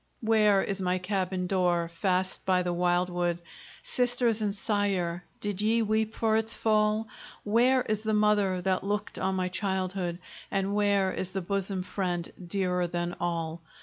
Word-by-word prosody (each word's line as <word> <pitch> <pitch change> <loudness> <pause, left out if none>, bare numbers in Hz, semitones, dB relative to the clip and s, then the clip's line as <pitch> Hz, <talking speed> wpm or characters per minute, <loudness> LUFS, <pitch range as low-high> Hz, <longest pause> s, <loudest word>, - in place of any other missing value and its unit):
Where 215 -3 +4
is 195 -1 -2
my 180 0 +1
cabin 185 -1 -1
door, 180 -2 +1
fast 185 +2 0
by 185 -1 +2
the 175 0 -1
wildwood? 175 0 +1 0.5
Sisters 245 -2 +1
and 205 -2 0
sire! 195 -5 -1 0.2
did 205 -1 -2
ye 225 +2 +3
weep 220 0 0
for 220 -1 +2
its 225 +1 0
fall? 215 0 +2 0.4
Where 245 +4 +3
is 215 -1 -1
the 215 0 0
mother 205 -3 +2
that 185 0 +1
looked 205 +1 -3
on 190 0 0
my 185 -1 0
childhood? 185 -2 -2 0.3
And 195 +1 -1
where 200 -2 +2
is 185 0 -3
the 190 - -1
bosom 195 0 -2
friend, 180 -3 -3
dearer 180 -1 0
than 175 0 -3
all? 165 -1 -2
195 Hz, 155 wpm, -28 LUFS, 180-210 Hz, 0.5 s, Where